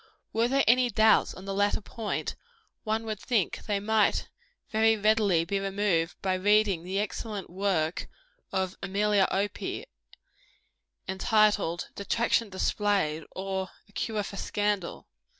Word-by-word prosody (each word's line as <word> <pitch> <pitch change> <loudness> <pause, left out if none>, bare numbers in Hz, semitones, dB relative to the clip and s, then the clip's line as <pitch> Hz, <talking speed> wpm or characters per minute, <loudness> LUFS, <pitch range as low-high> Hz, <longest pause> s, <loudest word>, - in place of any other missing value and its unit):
Were 230 +1 +2
there 275 +2 +2
any 250 +2 +5
doubts 220 0 +4
on 185 - -10
the 195 - -3
latter 205 +1 +1
point, 220 0 -4 0.5
one 220 0 -1
would 215 -2 -4
think 225 -5 -1
they 205 -2 +1
might 215 0 +1 0.4
very 220 0 +4
readily 205 -5 +3
be 195 +3 -1
removed 195 -4 0
by 190 -1 +1
reading 200 -1 +3
the 185 +3 -4
excellent 210 -1 -4
work 180 -4 -1 0.4
of 190 -1 -1
Amelia 200 0 +2
Opie, 200 +1 -2 1.2
entitled, 200 -2 +2
"Detraction 230 +2 0
Displayed; 190 -5 0
or, 190 0 -3 0.2
a - - -23
Cure 215 0 -2
for 200 - -7
Scandal." 205 -4 -2
205 Hz, 130 wpm, -28 LUFS, 190-215 Hz, 1.2 s, any